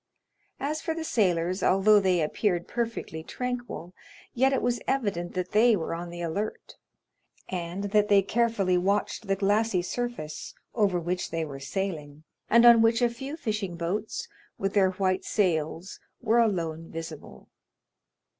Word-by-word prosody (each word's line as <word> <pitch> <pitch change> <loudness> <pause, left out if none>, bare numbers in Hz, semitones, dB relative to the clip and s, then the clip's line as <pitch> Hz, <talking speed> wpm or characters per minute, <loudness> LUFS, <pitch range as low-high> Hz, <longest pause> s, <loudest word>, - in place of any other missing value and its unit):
As 305 +3 -2
for 325 -1 -2
the 325 - -4
sailors, 185 - +1
although 205 +3 +5
they 185 -3 +2
appeared 175 +2 0
perfectly 230 -9 -3
tranquil 245 -4 -5 0.4
yet 265 +2 +3
it 270 - 0
was 245 0 0
evident 200 -11 -1
that 180 0 -2
they 225 +2 +5
were 165 -4 -3
on 170 +1 -5
the 175 0 -7
alert, 200 +6 -4 0.8
and 180 +1 -4
that 210 -1 +4
they 200 -1 +5
carefully 205 -4 +1
watched 200 +3 -1
the 195 - +2
glassy 200 -1 +1
surface 185 -9 -5 0.2
over 200 -6 +2
which 180 +2 -2
they 165 -1 -2
were 140 -2 -8
sailing, 150 -1 -4 0.3
and 235 +1 +6
on 235 -1 +9
which 225 0 +4
a 240 - +4
few 270 +6 -6
fishing 210 - -3
boats, 195 +6 -3 0.3
with 195 0 -2
their 195 -2 +4
white 185 0 0
sails, 170 -2 -1 0.2
were 235 0 +2
alone 165 -7 0
visible. 160 - -8
195 Hz, 150 wpm, -27 LUFS, 175-230 Hz, 0.8 s, on